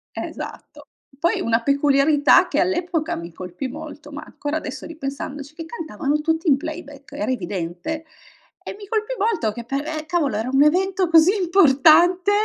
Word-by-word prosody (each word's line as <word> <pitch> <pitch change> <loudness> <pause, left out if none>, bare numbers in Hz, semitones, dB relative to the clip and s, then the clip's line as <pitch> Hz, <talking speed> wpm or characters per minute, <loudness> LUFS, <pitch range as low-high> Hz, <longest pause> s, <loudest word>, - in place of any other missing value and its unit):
È - - -4
esatto. - - -8 0.3
Poi, 335 +4 +1
una 230 0 +1
peculiarità 280 +2 +4
che, - - 0
all'epoca, 350 -2 0
mi 170 0 -7
colpì 180 +9 -6
molto, 275 - -9
ma, - - -7
ancora 295 +2 -4
adesso, 300 -2 -6
ripensandoci 280 -2 -6
che 330 - -7
cantavano 310 -3 -3
tutti 320 +2 0
in 275 - +5
playback, 285 -1 -9
era 285 -2 -2
evidente. 190 - -4 0.6
E - - -7
mi 410 - -10
colpì 440 +3 -2
molto, 395 - 0
che 235 - -7
per 275 +5 -3
eh, 310 -1 -4
cavolo, 315 -9 0
era 225 +4 -2
un 270 +2 +5
evento 370 +4 +2
così 330 +2 +6
importante, 350 +2 +5
300 Hz, 165 wpm, -22 LUFS, 270-335 Hz, 0.6 s, così